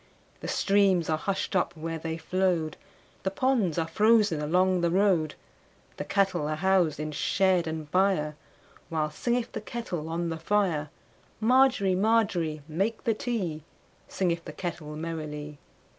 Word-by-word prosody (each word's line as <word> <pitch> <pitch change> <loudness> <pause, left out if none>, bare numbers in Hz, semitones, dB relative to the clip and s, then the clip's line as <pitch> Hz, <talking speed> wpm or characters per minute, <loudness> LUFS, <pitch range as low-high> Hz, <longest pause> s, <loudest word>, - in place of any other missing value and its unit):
The - - -6
streams 195 -5 +2
are 155 - +2
hushed 195 +1 -2
up 175 -2 0
where 165 +1 -4
they 160 0 -4
flowed, 170 -2 0 0.5
The 190 - 0
ponds 215 - +1
are 165 -1 0
frozen 210 -4 +3
along 180 +4 +2
the 170 - +2
road, 180 -4 +2 0.6
The - - -3
cattle 190 -6 +1
are 155 - -1
housed 175 -3 +2
in 155 0 -3
shed 180 +3 +2
and 160 -1 -4
byreWhile 155 -3 -2
singeth 240 +7 -1
the 220 - -5
kettle 205 -9 -5
on 170 +1 -2
the 165 0 -4
fire. 165 -5 +1 0.5
Margery, 245 -4 +4
Margery, 185 -7 +1
make 195 +8 -1
the 230 - +2
tea, 200 -9 -3 0.5
Singeth 170 -3 -1
the 155 - -7
kettle 160 -4 -5
merrily. 150 -2 -5
175 Hz, 145 wpm, -28 LUFS, 155-200 Hz, 0.6 s, Margery